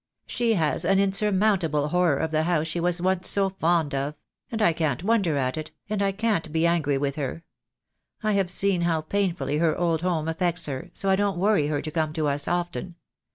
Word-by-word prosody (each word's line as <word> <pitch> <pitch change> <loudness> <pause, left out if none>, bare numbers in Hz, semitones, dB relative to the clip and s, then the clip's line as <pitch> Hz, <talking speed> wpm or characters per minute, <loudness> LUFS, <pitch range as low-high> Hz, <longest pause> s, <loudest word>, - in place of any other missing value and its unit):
"She 235 -2 0
has 160 -5 +1
an 195 - +3
insurmountable 195 -6 +1
horror 175 -4 +2
of 160 +2 -2
the 155 0 +2
house 160 -1 +1
she 160 +2 -3
was 175 0 +1
once 185 -1 +1
so 195 -1 +3
fond 170 -5 +1
of; 140 +2 -2 0.4
and 225 - -3
I 170 -6 +4
can't 155 -1 -1
wonder 195 -8 +2
at 130 0 -1
it, 155 0 -5 0.2
and 210 -1 0
I 200 0 +2
can't 200 -6 -1
be 160 +1 +1
angry 155 -5 +1
with 140 +1 -2
her. 150 +3 -4 0.8
I 215 - +1
have 195 -3 +1
seen 190 0 +1
how 165 -2 +1
painfully 180 -3 -1
her 160 -2 +2
old 165 -2 0
home 170 -3 -1
affects 170 0 0
her, 145 +5 -5
so 195 - -3
I - - +5
don't 200 -1 0
worry 195 -5 +2
her 145 -1 -2
to 155 - -5
come 155 -1 -1
to 155 -2 -1
us 145 0 -1
often. 175 -1 -2
170 Hz, 210 wpm, -25 LUFS, 155-190 Hz, 0.8 s, I